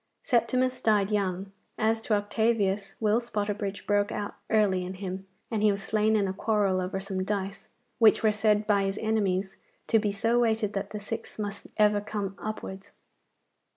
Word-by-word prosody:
Septimus 255 +1 +1
died 210 -2 +2
young. 195 -1 -1 0.3
As 225 +1 +1
to 220 -1 +1
Octavius, 205 -1 0
Will 215 +1 +3
Spotterbridge 205 -3 -3
broke 205 0 +2
out 205 - -4 0.2
early 200 -4 +3
in 185 +1 -5
him, 190 0 -6 0.2
and 220 -2 0
he 215 - +5
was 200 -1 -1
slain 215 +1 +2
in 200 -2 +2
a 190 - -2
quarrel 200 -2 +1
over 190 +1 -3
some 195 -1 -3
dice, 195 0 -3 0.3
which 225 -1 +6
were 215 - +5
said 210 0 +2
by 205 -2 +3
his 195 +1 -2
enemies 200 -3 0 0.3
to 225 - +3
be 210 -1 0
so 230 +4 +1
weighted 220 -3 +1
that 195 0 -3
the 210 - -5
six 215 +2 -6
must 205 -1 -5
ever 210 -1 +4
come 205 -2 -4
upwards. 200 -2 -6
205 Hz, 175 wpm, -28 LUFS, 195-220 Hz, 0.3 s, which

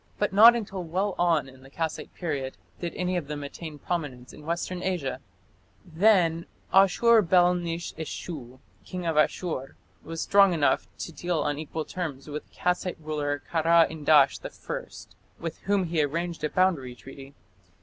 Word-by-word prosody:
But 205 -2 0
not 230 +4 +9
until 195 -5 -4
well 185 +4 -1
on 165 -5 +2
in 130 0 -15
the 135 - -15
Kassite 160 +2 -4
period 140 -6 -3 0.2
did 170 -2 -4
any 180 0 -1
of 160 -5 -4
them 145 -1 -5
attain 150 +2 -8
prominence 145 -7 -4
in 150 - -13
Western 175 +2 -2
Asia. 175 -9 -2 0.7
Then 170 -2 +3 0.3
Ashur 215 +4 +6
bel 180 -1 +4
nish 170 -1 -4
eshu, 150 -5 -7 0.3
King 180 -2 -6
of 165 -2 0
Asshur, 150 -2 0 0.3
was 165 0 -6
strong 195 0 +5
enough 145 -3 +2
to - - -6
deal 175 0 -2
on 145 0 -1
equal 155 0 -4
terms 155 -7 -5
with 150 0 -6
the - - -26
Kassite 180 0 -1
ruler 145 -2 -3
Kara 165 0 +5
indash 150 -3 +4
I, - - -7 0.4
with 165 -1 -5
whom 200 0 +2
he 165 -2 0
arranged 165 +3 -2
a 150 - +1
boundary 160 -10 +1
treaty. 135 +2 -12
165 Hz, 160 wpm, -27 LUFS, 145-180 Hz, 0.7 s, not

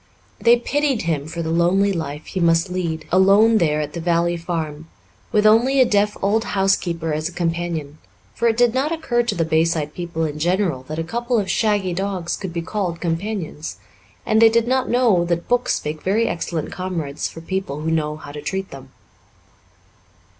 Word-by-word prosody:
They 235 +1 +5
pitied 280 0 0
him 155 -4 -1
for 165 +1 -4
the 160 - -2
lonely 185 +4 +3
life 155 -3 -5
he 190 - -4
must 165 +1 +2
lead 165 -3 -3
alone 200 +5 +5
there 155 -3 +1
at 150 0 -5
the 170 - -4
Valley 170 0 +1
Farm, 160 -2 -4 0.4
with 210 0 +2
only 240 +6 +5
a 260 - +7
deaf 210 -2 +1
old 215 +3 +2
housekeeper 175 -6 0
as 155 +2 -2
a - - -12
companion, 165 -3 -3 0.3
for 235 - 0
it 225 -1 +1
did 240 -1 +4
not 270 +4 0
occur 315 -8 0
to 240 - -2
the 165 - 0
Bayside 160 -1 +1
people 170 -2 -3
in 150 -1 -4
general 175 -4 0
that 155 - -5
a 165 - -1
couple 235 +7 -1
of 200 -3 0
shaggy 205 -5 +1
dogs 185 -2 -2
could 190 -3 -6
be 170 0 -3
called 180 -2 -3
companions, 170 -2 -3 0.5
and 220 +1 +3
they 225 - +8
did 230 +1 +2
not 260 +1 +1
know 235 -8 +3
that 170 0 -2
books 245 -8 0
make 150 +1 -4
very 220 +5 +1
excellent 165 -2 -3
comrades 170 -6 -3
for - - -10
people 165 -5 -3
who 160 +1 -1
know 150 -2 0
how 150 -2 -10
to 150 0 -7
treat 190 +3 -4
them. 135 -1 -11
175 Hz, 190 wpm, -21 LUFS, 160-210 Hz, 0.5 s, they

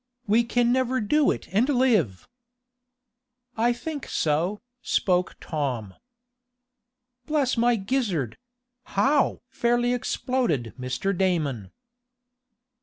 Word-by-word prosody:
"We 220 +3 +3
can 240 0 +1
never 260 0 +1
do 285 +8 +2
it - - -2
and 230 +8 +3
live!" 220 - +2 1.3
"I 235 +2 +2
think 290 +4 -5
so," 165 +7 0 0.2
spoke 180 -6 +1
Tom. 130 - -3 1.3
"Bless 290 -4 +1
my 240 0 +3
gizzard! 195 - -1 0.6
How?" 280 -2 +2
fairly 240 -1 +1
exploded 240 - -1
Mr. 130 +10 -2
Damon. 155 - -1
225 Hz, 95 wpm, -25 LUFS, 160-250 Hz, 1.3 s, We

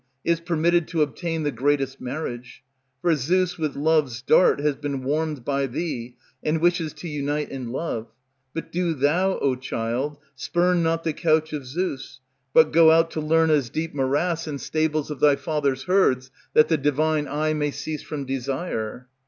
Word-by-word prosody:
is 170 -1 +1
permitted 170 0 +1
to 165 -3 +1
obtain 165 +2 -3
The 145 - 0
greatest 135 -1 0
marriage. 125 -2 -6 0.4
For 175 -1 +4
Zeus 180 +6 0
with 155 -3 -2
love's 145 -5 +1
dart 180 - +5
Has 145 0 +1
been 140 -2 -4
warmed 150 -1 -1
by 140 -1 0
thee, 125 -4 -4 0.3
and 155 +1 0
wishes 170 -1 +1
to 175 - -8
unite 150 0 -2
In 130 -3 -5
love; 125 -5 -3 0.4
but 165 - -6
do 175 -2 0
thou, 170 +8 +2
O 135 - +1
child, 125 +3 -3 0.2
spurn 175 +5 +1
not 165 0 0
the 160 - -1
couch 155 0 +1
Of 140 -4 -5
Zeus, 135 -3 -4 0.3
but 160 +2 +5
go 165 0 +7
out 165 +1 +4
to - - -3
Lerna's 155 -4 +3
deep 160 +4 -3
Morass, 155 +5 0
and 145 -2 -4
stables 155 -1 -1
of 145 - -5
thy 145 0 +5
father's 140 -4 -1
herds, 130 -9 +2 0.2
That 155 - +7
the 160 - +2
divine 150 +1 +1
eye 155 +2 0
may 150 -1 0
cease 155 +1 -5
from 145 -3 -5
desire." 130 -3 -3
150 Hz, 170 wpm, -24 LUFS, 135-165 Hz, 0.4 s, go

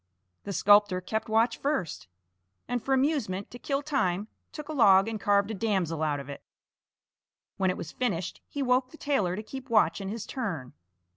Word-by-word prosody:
The 200 - -4
sculptor 205 +1 +5
kept 220 +5 -3
watch 225 +2 +2
first, 275 - -2 0.6
and 245 -2 -2
for 270 - -3
amusement 260 -9 0
to 245 - -9
kill 275 +2 -2
time 210 -9 0 0.2
took 300 -1 -8
a 310 - -5
log 195 -8 +6
and 225 -1 -3
carved 200 +1 +2
a - - -3
damsel 190 -7 -1
out 150 -2 0
of 140 - -8
it. 140 - -8 1.2
When 190 -1 +2
it 180 - -1
was 160 - -6
finished, 190 -8 -2
he 285 - -3
woke 255 0 +2
the 315 - -14
tailor 235 - 0
to 215 - -5
keep 265 +3 -9
watch 215 -2 +3
in 195 - -4
his 215 0 -5
turn. 175 - -4
215 Hz, 190 wpm, -28 LUFS, 185-255 Hz, 1.2 s, log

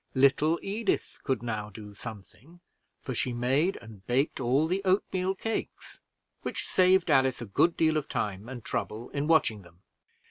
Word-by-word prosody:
Little 140 +5 +4
Edith 210 +3 -1
could 130 -4 -1
now 105 -3 -3
do 105 0 -10
something, 120 - -11 0.4
for 130 - -4
she 125 +1 -1
made 135 +10 +1
and 110 -4 -13
baked 135 +5 +1
all 130 +4 +2
the 185 +4 0
oatmeal 190 0 +1
cakes, 225 +3 -5 0.4
which - - -3
saved 185 -2 +4
Alice 130 -2 +3
a 120 - -5
good 165 - +2
deal 160 -1 +3
of 150 - -2
time 105 +2 -3
and 125 -4 -8
trouble 110 +3 -3
in 145 +1 -2
watching 140 -10 +3
them. 85 0 -19
130 Hz, 165 wpm, -29 LUFS, 110-165 Hz, 0.4 s, Little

